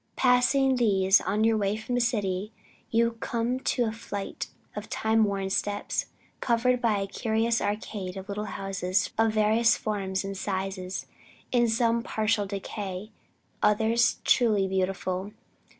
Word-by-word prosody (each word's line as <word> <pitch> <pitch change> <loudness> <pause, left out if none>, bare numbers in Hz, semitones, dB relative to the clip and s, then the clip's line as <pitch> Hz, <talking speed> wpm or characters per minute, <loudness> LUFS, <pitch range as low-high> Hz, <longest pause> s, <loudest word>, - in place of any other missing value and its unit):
Passing 260 +1 +3
these, 195 -4 +4
on 205 +4 0
your 225 0 +3
way 205 0 0
from 220 +3 -5
the 245 - +2
city, 210 -4 -1 0.4
you 230 0 +1
come 240 +3 -1
to 250 -1 0
a 220 - -1
flight 205 -3 -5 0.3
of - - -6
time 220 0 +2
worn 195 -1 -2
steps, 205 +1 -1 0.3
covered 245 +1 +2
by 225 -3 +2
a 195 - -1
curious 225 +3 0
arcade 205 -2 -3
of 190 0 -7
little 210 +1 -3
houses 195 -1 -1
of 225 -1 +3
various 220 +2 +3
forms 195 -3 -2
and 195 0 -4
sizes, 190 -1 -3 0.6
some 230 +1 +2
in - - -2
partial 215 -2 0
decay, 195 0 -5 0.5
others 220 +3 +3
truly 215 -6 +3
beautiful. 190 +1 -2
210 Hz, 140 wpm, -27 LUFS, 195-230 Hz, 0.6 s, these